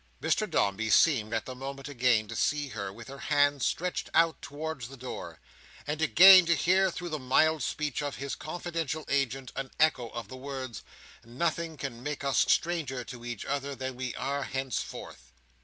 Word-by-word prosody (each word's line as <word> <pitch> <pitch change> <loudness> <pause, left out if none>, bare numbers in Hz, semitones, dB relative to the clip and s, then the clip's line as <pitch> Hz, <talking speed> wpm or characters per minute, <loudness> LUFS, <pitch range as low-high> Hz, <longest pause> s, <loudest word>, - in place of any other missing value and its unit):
Mr - - 0
Dombey 105 +3 0
seemed, 110 -1 +4
at 115 -1 -1
the 130 - -6
moment, 135 +2 -7
again 125 -5 +2
to - - -7
see 145 -2 0
her 100 -6 -5
with 115 +3 -11
her 140 +1 -9
hand 145 -1 +2
stretched 180 +7 -1
out 165 -1 +3
towards 150 -4 -5
the 135 +1 -11
door, 125 +1 -7 0.5
and 150 +1 -3
again 185 +3 +9
to 170 - +4
hear 190 +3 +3
through 175 0 -5
the 155 -2 -3
mild 155 +4 +3
speech 150 -3 -2
of 145 -1 -3
his 140 0 -5
confidential 165 -2 -4
agent 135 -2 -1
an 135 -1 -4
echo 140 -7 +3
of 115 -2 -7
the 130 - -9
words, 130 -4 -6 0.4
"Nothing 160 +6 -2
can 125 -5 -6
make 145 +2 -4
us 140 -1 +2
stranger 155 -7 +1
to 120 0 -10
each 120 -3 -5
other 140 0 -3
than 130 -1 -5
we 125 -2 -4
are 140 +1 -2
henceforth!" 90 - -5
140 Hz, 180 wpm, -29 LUFS, 125-155 Hz, 0.5 s, again